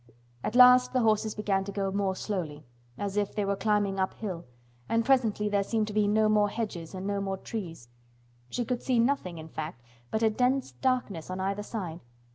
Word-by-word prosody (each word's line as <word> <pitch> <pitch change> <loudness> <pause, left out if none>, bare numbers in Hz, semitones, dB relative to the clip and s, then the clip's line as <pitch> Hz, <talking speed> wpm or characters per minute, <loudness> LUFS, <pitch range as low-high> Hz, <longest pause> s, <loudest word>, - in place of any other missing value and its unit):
At 225 - -2
last 250 0 +7
the 255 - +3
horses 215 -1 +2
began 200 -2 0
to 200 - -6
go 195 -1 -1
more 195 -1 0
slowly, 160 -8 -4 0.3
as 200 0 -3
if 205 -1 0
they 205 - 0
were 200 0 0
climbing 205 -2 +1
up 190 - 0
hill, 185 -6 -5 0.4
and 230 0 +2
presently 230 -5 +2
there 205 -1 +2
seemed 215 +2 0
to - - -5
be 210 -1 +2
no 215 +1 +3
more 210 -1 +3
hedges 195 -7 -5
and 185 +1 -5
no 200 0 -1
more 195 -1 -2
trees. 175 - -6 0.6
She 240 - -2
could 245 0 -2
see 255 -2 +1
nothing, 230 -8 +1
in 160 0 -8
fact, 155 -6 -6 0.3
but 220 - -1
a 220 - +4
dense 250 - +1
darkness 195 - -1
on 185 +1 -4
either 195 +2 -1
side. 185 -6 -5
205 Hz, 205 wpm, -29 LUFS, 190-225 Hz, 0.6 s, last